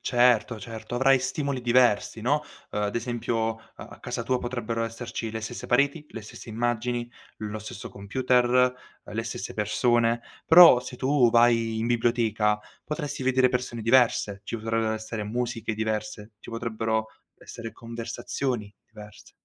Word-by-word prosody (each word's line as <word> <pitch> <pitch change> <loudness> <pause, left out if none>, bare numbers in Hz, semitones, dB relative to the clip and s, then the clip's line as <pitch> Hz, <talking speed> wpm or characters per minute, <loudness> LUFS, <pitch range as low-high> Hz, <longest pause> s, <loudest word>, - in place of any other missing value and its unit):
Certo, 120 -2 +3
certo, 115 +3 -7
avrai 135 +2 +4
stimoli 135 +1 -2
diversi, 120 -3 +3
no, 145 +6 +1 0.3
uhm, 105 - -2
ad 105 - -2
esempio, 115 -1 -1
uhm, 115 - -20 0.2
a - - -11
casa 115 - -4
tua 125 +2 0
potrebbero 120 -2 -3
esserci 115 0 -5
le 110 - -4
stesse 120 +2 -6
pareti, 140 +5 +2
le 115 - -7
stesse 105 - -11
immagini, 120 +1 -2 0.3
lo 110 0 -5
stesso 105 -1 -8
computer, 125 +5 +1 0.6
uhm, - - -11
le 115 - -1
stesse 110 -4 -6
persone. 115 +2 +2 0.3
Però 165 -7 +9
se 125 0 -8
tu 130 -2 +3
vai 115 -1 +3
in 115 - -1
biblioteca 115 -3 +1 0.3
potresti 150 -3 -4
vedere 130 0 +3
persone 125 -2 -3
diverse, 115 -4 +3
ci - - -4
potrebbero 115 0 -1
essere 110 -1 -4
musiche 115 0 -3
diverse, 110 0 -3
ci - - -12
potrebbero 110 -1 -2 0.3
essere 115 -1 -9
conversazioni 115 -1 -4
diverse. 105 -1 -14
115 Hz, 150 wpm, -26 LUFS, 110-125 Hz, 0.6 s, Però